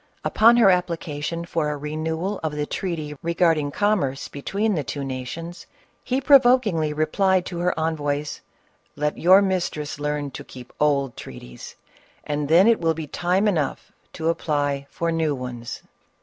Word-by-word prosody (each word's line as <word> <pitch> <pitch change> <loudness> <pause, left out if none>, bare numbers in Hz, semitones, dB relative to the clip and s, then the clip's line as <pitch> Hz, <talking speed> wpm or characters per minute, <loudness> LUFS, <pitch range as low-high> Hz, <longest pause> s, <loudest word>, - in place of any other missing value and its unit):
Upon 230 +2 +5
her 210 -5 +6
application 170 -2 -2
for 165 -3 -1
a 150 - -3
renewal 160 +6 -3
of 160 -2 -2
the 150 0 -1
treaty 155 -4 -4
regarding 165 -3 +2
commerce 145 -7 0
between 200 +9 -1
the 155 -5 -1
two 140 +1 -5
nations, 160 +6 -6 0.4
he 255 +1 0
pro 275 +1 +7
vokingly 215 -12 +2
replied 180 +5 +1
to 175 -2 -5
her 175 -1 0
envoys, 150 -2 -2 0.5
"Let 150 +1 -2
your 185 +4 +6
mistress 175 -6 -2
learn 145 -1 -2
to - - -8
keep 125 -1 -12
old 140 -4 +1
treaties, 60 -1 -10 0.5
and 145 -1 -3
then 170 +4 +6
it 230 -4 +4
will 165 -1 +1
be 160 -1 -5
time 180 +7 0
enough 155 -9 -1 0.2
to 160 0 -1
apply 145 -4 -1
for 170 0 -2
new 160 -3 0
ones 125 -2 -7
160 Hz, 155 wpm, -23 LUFS, 145-180 Hz, 0.5 s, pro